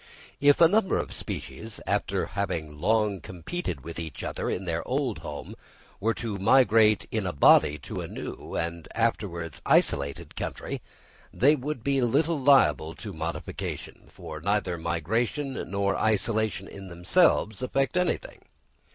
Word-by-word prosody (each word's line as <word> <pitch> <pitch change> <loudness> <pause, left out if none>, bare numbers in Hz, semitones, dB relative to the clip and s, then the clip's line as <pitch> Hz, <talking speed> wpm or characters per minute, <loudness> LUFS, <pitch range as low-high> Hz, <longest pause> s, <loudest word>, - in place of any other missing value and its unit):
If 145 0 +5
a 165 - +8
number 200 +2 +2
of - - -3
species, 110 -1 -6
after 100 -1 0
having 85 -7 -3
long 105 +1 +2
competed 90 - -5
with 85 +4 -7
each 80 -5 -6
other - - -3
in 95 - -2
their 85 -1 -1
old 130 -3 -1
home, 75 -1 -7 0.4
were 115 +2 +1
to 110 -4 -4
migrate 110 -1 +5
in 110 -4 -1
a 90 - -2
body 75 +1 +6
into 70 - -6
a - - -5
new - - -7
and 85 0 -3
afterwards 95 -8 -1
isolated 70 -1 +1
country, - - -4 0.5
they 145 +6 +4
would 140 -3 -4
be 140 0 +1
little 145 +6 +2
liable 85 - +4
to 105 -3 -8
modification; 80 +1 -5
for 80 0 -9
neither 100 -1 0
migration 110 - -2
nor 100 0 0
isolation 110 -2 0
in 100 -1 -10
themselves 95 - +2
effect 135 +3 0
anything. 180 - -1
105 Hz, 145 wpm, -27 LUFS, 85-125 Hz, 0.5 s, a